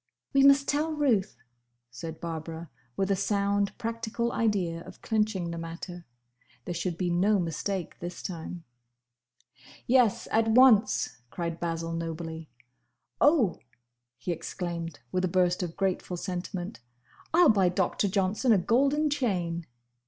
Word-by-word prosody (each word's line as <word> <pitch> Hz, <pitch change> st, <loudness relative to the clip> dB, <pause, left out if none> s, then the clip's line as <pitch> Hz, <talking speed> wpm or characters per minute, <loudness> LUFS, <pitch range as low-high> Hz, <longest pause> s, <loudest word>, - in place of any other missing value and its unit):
"We 275 Hz, -, +5 dB
must 275 Hz, 0 st, +6 dB
tell 305 Hz, +2 st, +1 dB
Ruth," 255 Hz, -10 st, +1 dB, 0.5 s
said 160 Hz, +6 st, -7 dB
Barbara, 165 Hz, -1 st, -6 dB, 0.3 s
with 195 Hz, 0 st, +1 dB
a -, -, +4 dB
sound 200 Hz, 0 st, 0 dB
practical 230 Hz, +1 st, -2 dB
idea 190 Hz, -8 st, 0 dB
of -, -, -13 dB
clinching 210 Hz, -6 st, 0 dB
the 170 Hz, -, -5 dB
matter. 170 Hz, +1 st, -7 dB, 0.6 s
There 175 Hz, -, -3 dB
should 175 Hz, 0 st, -2 dB
be 180 Hz, -1 st, 0 dB
no 195 Hz, +5 st, +3 dB
mistake 180 Hz, +1 st, -3 dB
this 175 Hz, 0 st, -6 dB
time. 170 Hz, -1 st, -6 dB, 1.2 s
"Yes! 245 Hz, -4 st, +3 dB
at 225 Hz, 0 st, +3 dB
once!" 225 Hz, -, +5 dB
cried 170 Hz, +1 st, -4 dB
Basil, 165 Hz, -1 st, -2 dB
nobly. 165 Hz, -1 st, -5 dB, 0.7 s
"Oh!" 290 Hz, -, +4 dB, 0.6 s
he 125 Hz, +9 st, -3 dB
exclaimed, 170 Hz, -3 st, -5 dB
with 185 Hz, 0 st, 0 dB
a -, -, +3 dB
burst 180 Hz, 0 st, +2 dB
of 175 Hz, -2 st, -4 dB
grateful 185 Hz, -2 st, -1 dB
sentiment, 175 Hz, -, -5 dB, 0.5 s
"I 345 Hz, +2 st, +5 dB
'll 335 Hz, -, +7 dB
buy 195 Hz, -4 st, +4 dB
Doctor 185 Hz, +3 st, 0 dB
Johnson 195 Hz, +5 st, +1 dB
a 215 Hz, -, +6 dB
golden 275 Hz, -, +2 dB
chain!" 180 Hz, -, -1 dB
185 Hz, 135 wpm, -28 LUFS, 170-220 Hz, 1.2 s, ll